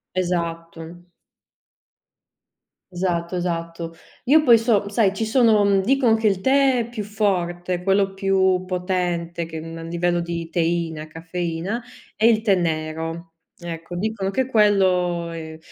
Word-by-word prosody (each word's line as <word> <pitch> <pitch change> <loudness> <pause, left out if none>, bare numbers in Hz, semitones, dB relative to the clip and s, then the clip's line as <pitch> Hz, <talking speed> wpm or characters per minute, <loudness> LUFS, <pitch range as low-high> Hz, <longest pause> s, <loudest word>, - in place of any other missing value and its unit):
Esatto. 170 -1 -3 1.9
Esatto, 175 -1 -2
esatto. 170 -1 -3 0.3
Io 300 +4 +5
poi 235 -4 +7
so 220 -3 +1
sai, 205 -2 +2
ci 220 +3 -2
sono, 220 -2 +4
mhmm, 195 -1 +3
dicon 250 0 +3
che 220 -1 +1
il 195 -3 +1
tè 265 +3 +3
è 230 - -2
più 230 -3 -5
forte, 180 -4 -1
quello 195 +1 +1
più 190 -1 +2
potente 180 -2 -2
che, 160 -1 -7
uhm, 165 +1 -7
a 165 - -7
livello 175 +1 -1
di 170 -1 -4
teina, 165 -2 -1
caffeina 170 +6 -4 0.3
è 220 - +1
il 225 -2 +5
tè 215 -3 +3
nero, 165 0 -3 0.3
ecco 170 0 -7
dicono 205 -1 -2
che 260 +5 0
quello 185 -7 +2
è 160 -1 -7
180 Hz, 135 wpm, -22 LUFS, 170-205 Hz, 1.9 s, poi